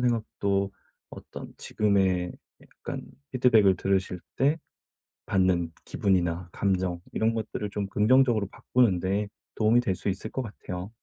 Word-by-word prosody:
생각도 100 -5 0 0.4
어떤 - - -10
지금의 95 -4 +1 0.3
약간 - - -7 0.3
피드백을 110 -7 +5
들으실 95 -1 0 0.2
때 145 +5 +3 0.7
받는 90 -3 +2
기분이나 90 -3 0
감정 95 -3 0
이런 115 +1 +2
것들을 110 -2 -3
좀 100 -1 -2
긍정적으로 110 0 +4
바꾸는 115 -8 +2
데 100 +3 0 0.3
도움이 115 +2 +4
될 95 -6 0
수 - - -6
있을 100 +3 -4
것 130 - -2
같아요. 95 -4 -6
100 Hz, 285 characters per minute, -27 LUFS, 95-110 Hz, 0.7 s, 피드백을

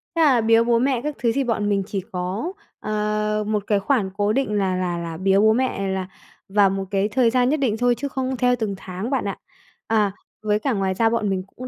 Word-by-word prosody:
thế 330 - +2
là 270 -7 +5
biếu 225 +1 +4
bố 235 0 +2
mẹ 255 -1 +1
các 300 0 -3
thứ 235 -1 +2
thì 275 - +1
bọn 220 -4 -1
mình 200 -1 +1
chỉ 195 -2 -3
có, 185 - -3 0.3
ờ, 210 0 -1
một 210 -1 0
cái 205 -2 +2
khoản 200 -1 0
cố 205 +1 +1
định 265 -4 0
là 195 -3 +1
là 180 -1 -1
là 165 -1 -5
biếu 195 +2 +3
bố 220 +1 +5
mẹ 235 -5 -1
là 190 -1 -2 0.4
vào 200 0 +4
một 195 0 -3
cái 195 0 +1
thời 245 +1 +3
gian 250 +1 +2
nhất 305 - +2
định 235 -6 0
thôi, 245 +1 +2
chứ 280 +4 -3
không 260 -1 -3
theo 250 0 +3
từng 215 -4 -3
tháng 190 +4 -6
bạn 270 -5 -1
ạ. 200 - -3 0.5
À, 215 -3 +2 0.3
với 210 0 +1
cả 270 +2 -1
ngoài 195 -2 0
ra 225 +4 +2
bọn 225 -3 0
mình 190 -1 -1
cũng 255 - -7
215 Hz, 245 wpm, -22 LUFS, 195-245 Hz, 0.5 s, là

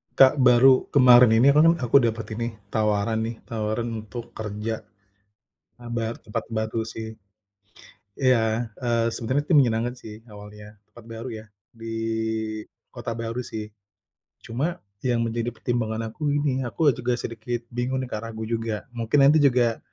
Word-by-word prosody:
Kak, 135 +1 +6
baru 130 +1 +6
kemarin 125 -3 +7
ini 130 +5 +6
aku 150 - +4
kan 165 +2 +6
aku 120 +2 0
dapat 115 0 -3
ini 115 0 -2 0.2
tawaran 110 +1 +1
nih, 115 - -5
tawaran 110 0 -3 0.2
untuk 120 +1 -8
kerja, 110 +1 -4 1.0
bar 120 -1 -4
tempat 105 - -5
baru 110 0 -2
sih, 110 0 -7 1.0
iya, 115 -3 +1
eee, 120 -2 0
sebenarnya 130 +5 -1
itu 175 - +3
menyenangkan 120 -2 +2
sih 110 -2 -11
awalnya, 105 +1 -12 0.2
tempat 120 - -14
baru 115 +2 -7
ya - - -14 0.3
di 115 0 -7 1.0
kota 115 - -5
baru 115 +1 -4
sih. 110 -3 -6 0.8
Cuma 145 +10 -2 0.3
yang 120 -2 +1
menjadi 115 +1 -2
pertimbangan 115 -1 -2
aku 145 +5 -2
ini 140 -3 0
aku 150 +5 +2
juga 125 +1 -1
sedikit 120 +1 -5
bingung 125 +2 -1
nih, 130 - -7
Kak, 105 - -3
ragu 110 -1 -6
juga, 115 -2 -3
mungkin 120 +4 +1
nanti 150 +3 +6
juga, 120 -5 +3
115 Hz, 150 wpm, -24 LUFS, 110-125 Hz, 1.0 s, kemarin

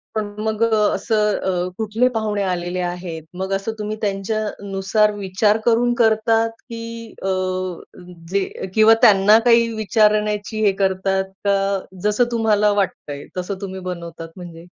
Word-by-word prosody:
पण 215 -1 -1 0.2
मग 220 0 -2
अ, 225 -1 +3 0.2
असं 210 -2 +1
अ, 180 0 -1
कुठले 220 +3 +1
पाहुणे 215 -2 -1
आलेले 180 -1 -2
आहेत? 175 -2 -5
मग 190 +1 -3
असं 195 +3 -2
तुम्ही 210 +1 -3
त्यांच्यानुसार 205 0 0
विचार 205 +2 +1
करून 240 +1 +3
करतात 225 +1 +3 0.2
की 230 0 -6 0.4
अ, 195 - -3 1.0
जे 195 0 +1 0.2
अ, - - -1
किंवा 220 +1 +6
त्यांना 205 +1 +6
काही 235 -1 +5
विचारण्याची 210 0 +1
हे 200 - +5
करतात 190 0 +1 0.2
का? 195 0 +1 0.2
जसं 210 +3 +3
तुम्हाला 210 -2 +2
वाटतंय 145 -6 -5
तसं 190 +2 -4
तुम्ही 190 -1 -5
बनवतात 170 -1 -8
म्हणजे? 170 -1 -10
205 Hz, 140 wpm, -20 LUFS, 190-220 Hz, 1.0 s, किंवा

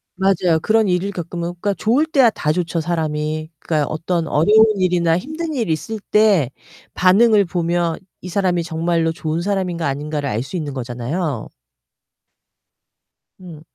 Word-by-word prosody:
맞아요. 185 -3 +2
그런 220 +1 +2
일을 180 +2 0
겪으면 175 -1 -5
그러니까 205 -1 +1
좋을 245 +11 +2
때야 270 -7 +4
다 150 -5 -1
좋죠, 170 -1 -1
사람이. 155 -1 -2
그러니까 150 -3 -1
어떤 165 +1 -2
어려운 210 +10 +5
일이나 175 -2 +2
힘든 315 - -5
일이 230 - -1
있을 220 +8 -5
때 205 - +4 0.5
반응을 205 +2 +5
보면 170 -1 -1 0.2
이 180 - -7
사람이 180 -2 0
정말로 165 0 0
좋은 160 0 -3
사람인가 180 -3 -2
아닌가를 145 +1 -3
알 115 -4 -1
수 185 - -7
있는 150 -4 -4
거잖아요. 125 +3 -4 1.9
음. 170 -5 -11
175 Hz, 325 characters per minute, -19 LUFS, 155-195 Hz, 1.9 s, 어려운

